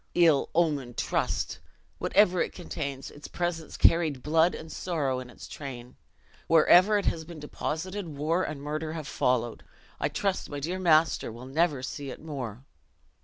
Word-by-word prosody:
Ill 165 -5 +4
omened 145 -8 +1
trust! - - -1 0.4
whatever 185 -4 +4
it - - -1
contains, 140 -6 -5
its 145 - -10
presence 175 -2 -3
carried 155 -6 +3
blood 160 +3 +3
and 160 - -9
sorrow 145 -8 -1
in 125 -1 -8
its - - -11
train. 125 -4 -8 0.5
Wherever 180 +6 +6
it 205 - -1
has 160 - 0
been 165 0 -10
deposited 170 +6 -4
war 155 +4 0
and 145 -5 -4
murder 155 +2 -3
have 155 -3 -5
followed: 120 -4 0 0.4
I - - +1
trust 195 -2 -1
my 145 - -4
dear 175 +6 -3
master 160 -7 +3
will 120 +3 -9
never 145 0 +1
see 140 +1 -5
it - - -7
more!" 135 -6 -6
155 Hz, 160 wpm, -28 LUFS, 135-170 Hz, 0.5 s, Wherever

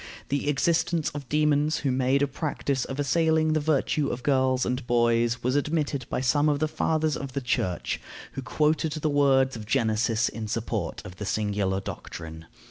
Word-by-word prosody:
The 140 +1 0
existence 165 +2 +1
of 145 -3 -8
demons 150 0 +2
who 140 - +1
made 130 +2 +2
a - - +2
practice 140 -2 -2
of 135 +1 -6
assailing 160 +1 +2
the 155 - +2
virtue 150 -1 +1
of 120 +1 -4
girls 130 -2 +2
and 125 0 -2
boys 120 0 +2
was 125 +2 +1
admitted 145 -3 -1
by - - -1
some 145 +4 +3
of 145 - +2
the 155 +2 0
fathers 155 -1 0
of 140 -2 -6
the 140 - -1
Church, 105 -8 -1 0.3
who 135 - -5
quoted 155 +3 +1
the 155 -1 -1
words 135 -2 +3
of 110 -2 -8
Genesis 110 +1 +1
in 110 -1 -5
support 110 -5 -3
of 90 - -10
the 105 - -5
singular 100 -3 0
doctrine. 80 -3 -8
135 Hz, 180 wpm, -26 LUFS, 120-150 Hz, 0.3 s, some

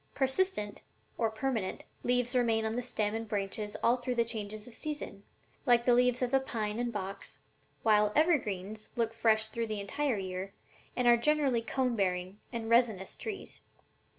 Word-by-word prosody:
Persistent, 265 - 0 0.3
or 225 -2 +1
permanent, 220 -3 -2 0.2
leaves 245 0 +1
remain 225 -3 +3
on 220 +1 -1
the 245 - 0
stem 215 -4 -1
and 225 0 -3
branches 205 0 -2
all 240 +2 +4
through 250 0 -3
the 235 -1 +3
changes 215 -1 -4
of 245 - -11
season, 295 -7 -4 0.5
like 240 -1 +5
the 245 - +5
leaves 250 +1 +3
of 250 - 0
the 270 - +5
pine 220 -4 -3
and 240 0 -1
box, 195 -2 -5 0.5
while 210 -1 +4
evergreens 215 - +1
look 230 -1 0
fresh 220 -1 +3
through 230 +1 -2
the 215 -1 -3
entire 250 +5 -1
year 190 0 -4 0.4
and 250 -1 +1
are 240 0 +7
generally 275 -2 +2
cone 250 +1 0
bearing 185 -1 -1
and 230 -2 -4
resinous 225 -5 +2
trees. 425 -3 -6
230 Hz, 170 wpm, -31 LUFS, 210-245 Hz, 0.5 s, are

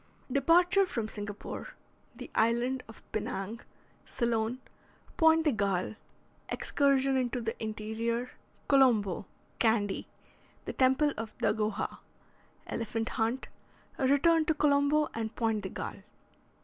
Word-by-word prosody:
DEPARTURE 350 +8 +4
FROM 230 -10 -2
SINGAPORE 205 - -7 0.4
THE - - -9
ISLAND 240 +3 +1
OF 225 - -14
PINANG 215 0 -3 0.5
CEYLON 235 0 0 0.6
POINTE 320 0 +5
DE 305 - +3
GALLE 200 -4 0 0.6
EXCURSION 275 -1 +2
INTO 250 -1 0
THE 225 -1 -3
INTERIOR 225 +3 -3 0.4
COLOMBO 225 -9 +3 0.3
CANDY 220 -4 +1 0.6
THE - - -4
TEMPLE 265 +3 +3
OF 220 0 -6
DAGOHA 215 -1 -1 0.7
ELEPHANT 225 0 -3
HUNT 235 +3 -1 0.5
RETURN 295 +4 +4
TO 315 - +1
COLOMBO 290 +1 +3
AND 225 0 -4
POINTE 225 -2 0
DE - - -5
GALLE. - - -6
235 Hz, 110 wpm, -30 LUFS, 220-280 Hz, 0.7 s, POINTE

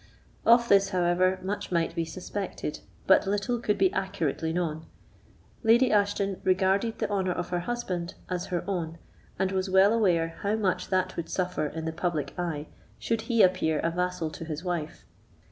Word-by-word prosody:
Of 235 +1 +6
this, 195 -2 +5
however, 185 0 +2
much 195 +1 -4
might 170 -2 +1
be 165 - -1
suspected, 185 -1 -5 0.3
but 190 - +5
little 205 +5 0
could 210 -3 0
be 380 0 +3
accurately 165 -5 -1
known: 160 -2 -2 0.7
Lady 235 +3 +4
Ashton 200 -2 +1
regarded 190 +4 +2
the 215 - -1
honour 190 -3 0
of - - -4
her 175 - 0
husband 180 -4 -3
as 180 -1 -3
her 175 -2 -2
own, 170 -4 -3 0.4
and 190 0 0
was 190 0 -1
well 190 +3 +5
aware 170 -7 +1
how 205 +1 +1
much 200 -4 0
that 185 -1 0
would 165 - -4
suffer 180 -4 -1
in 160 +2 -6
the 160 - -2
public 165 -3 -2
eye 160 -4 -2 0.3
should 230 -1 -1
he 230 -2 +5
appear 180 -4 +3
a 165 - 0
vassal 180 -2 -2
to 165 - -8
his 160 0 -5
wife. 175 -4 -4
185 Hz, 175 wpm, -28 LUFS, 170-200 Hz, 0.7 s, Of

